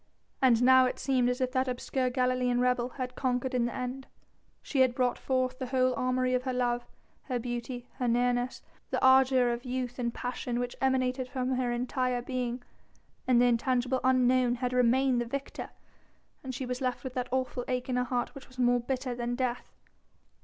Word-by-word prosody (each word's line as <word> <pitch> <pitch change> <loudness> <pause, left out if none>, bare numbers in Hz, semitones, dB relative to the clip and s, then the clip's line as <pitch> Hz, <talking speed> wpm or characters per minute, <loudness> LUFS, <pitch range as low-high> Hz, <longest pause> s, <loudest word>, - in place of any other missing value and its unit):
And 245 -3 +4
now 260 0 +7
it - - -3
seemed 255 -2 +1
as 250 +1 -2
if 255 0 0
that 260 0 0
obscure 255 +1 -1
Galilean 250 -1 +1
rebel 250 -1 +1
had 250 -1 -3
conquered 255 -1 -1
in 245 -2 +2
the 240 - -3
end. 255 +1 -5 0.6
She 275 - -2
had 255 -2 +4
brought 250 -1 +1
forth 255 0 -1
the 260 - -3
whole 255 0 +2
armoury 255 0 0
of 250 - +2
her 255 0 -3
love, 245 -1 -1 0.4
her 255 -3 -1
beauty, 240 +1 -5
her 250 -2 -1
nearness, 245 +1 0 0.3
the - - 0
ardour 260 -2 +5
of 235 +1 -4
youth 250 -1 -4
and 235 -1 0
passion 245 0 -4
which 245 0 -3
emanated 255 -1 +1
from 255 0 -2
her 255 -1 0
entire 250 0 -1
being, 250 -1 -3 0.6
and 250 -2 +5
the 245 - +5
intangible 250 +1 +1
Unknown 255 -1 +3
had 250 0 -2
remained 250 +1 +3
the - - -2
victor, 275 +4 -5 0.7
and 260 -2 -5
she 260 - -4
was 250 +1 -4
left 255 -1 -2
with 260 -2 -5
that 250 -1 -3
awful 255 -1 -1
ache 250 -1 -2
in 255 - -1
her 250 - +2
heart 245 -1 -2
which 275 -2 -11
was 255 - -19
more 245 -1 +3
bitter 255 +1 -3
than 240 0 -3
death. 250 -1 -3
250 Hz, 195 wpm, -29 LUFS, 245-255 Hz, 0.7 s, now